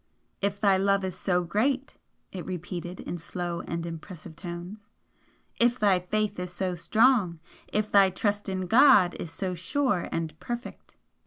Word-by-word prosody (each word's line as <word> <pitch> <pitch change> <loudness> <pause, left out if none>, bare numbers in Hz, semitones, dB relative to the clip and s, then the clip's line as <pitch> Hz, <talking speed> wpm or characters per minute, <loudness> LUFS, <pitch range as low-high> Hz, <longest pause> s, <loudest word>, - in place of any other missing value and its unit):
"If 200 0 -1
thy 195 -2 +4
love 195 0 +2
is 185 -1 -4
so 180 -1 0
great!" 250 - 0 0.4
it 185 -3 -6
repeated, 180 0 -6
in 175 - -5
slow 175 +1 -4
and 170 0 -3
impressive 165 0 -8
tones 180 +5 -8 0.7
"If 240 +1 +4
thy 200 -5 +3
faith 205 +2 -1
is 180 0 -4
so 185 0 -2
strong! 205 -1 +3 0.3
If 210 0 -1
thy 195 -1 +6
trust 205 +2 -1
in 185 -1 -2
God 220 -4 +6
is 170 - -5
so 185 +1 -3
sure 205 - 0
and 160 -2 -3
perfect!" 240 0 -7
185 Hz, 155 wpm, -27 LUFS, 175-210 Hz, 0.7 s, thy